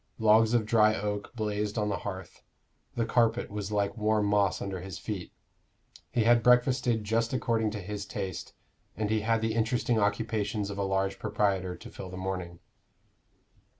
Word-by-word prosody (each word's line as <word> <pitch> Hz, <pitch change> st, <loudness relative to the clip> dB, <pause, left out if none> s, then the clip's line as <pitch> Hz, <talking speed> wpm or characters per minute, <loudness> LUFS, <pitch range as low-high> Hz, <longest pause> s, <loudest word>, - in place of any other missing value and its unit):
Logs 110 Hz, +1 st, +5 dB
of 115 Hz, -3 st, +2 dB
dry 110 Hz, -1 st, +4 dB
oak 105 Hz, 0 st, -3 dB
blazed 105 Hz, -1 st, -2 dB
on 105 Hz, -1 st, 0 dB
the 100 Hz, -, -1 dB
hearth; 95 Hz, -3 st, -7 dB, 0.5 s
the 115 Hz, -, 0 dB
carpet 115 Hz, 0 st, +1 dB
was 105 Hz, 0 st, -4 dB
like 100 Hz, 0 st, 0 dB
warm 105 Hz, -1 st, +1 dB
moss 100 Hz, -2 st, +2 dB
under 95 Hz, -2 st, -4 dB
his 95 Hz, -2 st, -7 dB
feet; 95 Hz, -2 st, -5 dB, 0.8 s
he 115 Hz, -, +1 dB
had 120 Hz, +1 st, +5 dB
breakfasted 125 Hz, -2 st, +3 dB
just 115 Hz, +3 st, 0 dB
according 115 Hz, -3 st, +1 dB
to 105 Hz, 0 st, -5 dB
his 100 Hz, +1 st, -5 dB
taste, 95 Hz, -6 st, -5 dB, 0.4 s
and 105 Hz, 0 st, -1 dB
he 110 Hz, -1 st, +2 dB
had 115 Hz, +1 st, +1 dB
the 110 Hz, 0 st, 0 dB
interesting 115 Hz, +1 st, +1 dB
occupations 105 Hz, 0 st, -1 dB
of 100 Hz, -, -6 dB
a -, -, +1 dB
large 95 Hz, 0 st, 0 dB
proprietor 100 Hz, -4 st, 0 dB
to -, -, -12 dB
fill 95 Hz, -, -8 dB
the 90 Hz, -, -8 dB
morning. 90 Hz, -2 st, -4 dB
105 Hz, 170 wpm, -29 LUFS, 100-115 Hz, 0.8 s, Logs